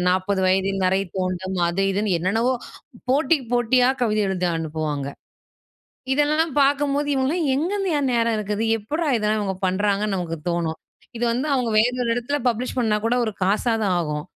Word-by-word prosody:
40 190 +1 +1
வயதில் 195 +1 +1
நறை 190 +1 +2 0.2
தோண்றும். 185 0 -2
அது 185 +3 -1
இதுன்னு 205 -1 0
என்னென்னவோ 225 +9 +1 0.6
போட்டிக்கு 290 0 +2
போட்டியா 245 +1 +3
கவிதை 215 -2 +1
எழுதி 180 -1 -1
அனுப்புவாங்க. 155 -3 -3 1.1
இதெல்லாம் 300 +1 +1
பார்க்கும்போது 285 +1 +2
இவுங்கலாம் 295 +5 0
எங்கேருந்துய்யா! 355 +1 0
நேரம் 230 -1 +2
இருக்குது. 210 +1 -2
எப்புட்றா 300 +10 -3
இதெல்லாம் 215 0 0
இவங்க 195 -2 -2
பண்றாங்கன்னு 200 +1 0
நமக்கு 165 -2 -3
தோணும். 170 -2 -1 0.4
இது 235 - -3
வந்து 255 +6 -1
அவுங்க 250 -3 0
வேற 230 +3 +4
ஒரு 235 - -1
இடத்துல 245 +4 -1
பப்ளிஷ் 240 +3 -3
பண்ணா 220 -3 +2
கூட 235 +2 +2
ஒரு 220 - -2
காசா 210 +5 +1 0.3
ஆகும். 150 -3 -3
215 Hz, 150 wpm, -22 LUFS, 185-260 Hz, 1.1 s, வேற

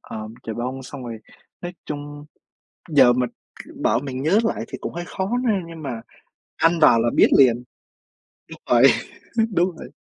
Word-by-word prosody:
ờm, 110 +1 -8
chà 110 - -5
bông 125 +3 -4
xong 130 0 -9
rồi 115 -2 -6 0.4
nói 175 0 -6
chung 145 0 -7 0.7
giờ 130 -5 +6
mình, 125 -1 0
k - - -16
bảo 115 - +2
mình 130 -1 -5
nhớ 175 +9 +3
lại 225 - -1
thì - - -7
cũng - - -5
hơi 175 +1 -5
khó 190 - -3
n 215 -8 0
nhưng 165 -2 -10
mà 120 -5 -4 0.5
ăn 165 +1 +2
vào 115 -6 +6
là 120 - +2
biết - - +6
liền 125 -2 +5 0.9
đúng - - -11
vậy, 120 0 +5 0.7
đúng 175 0 +2
vậy. 125 - -9
140 Hz, 180 wpm, -22 LUFS, 120-165 Hz, 0.9 s, giờ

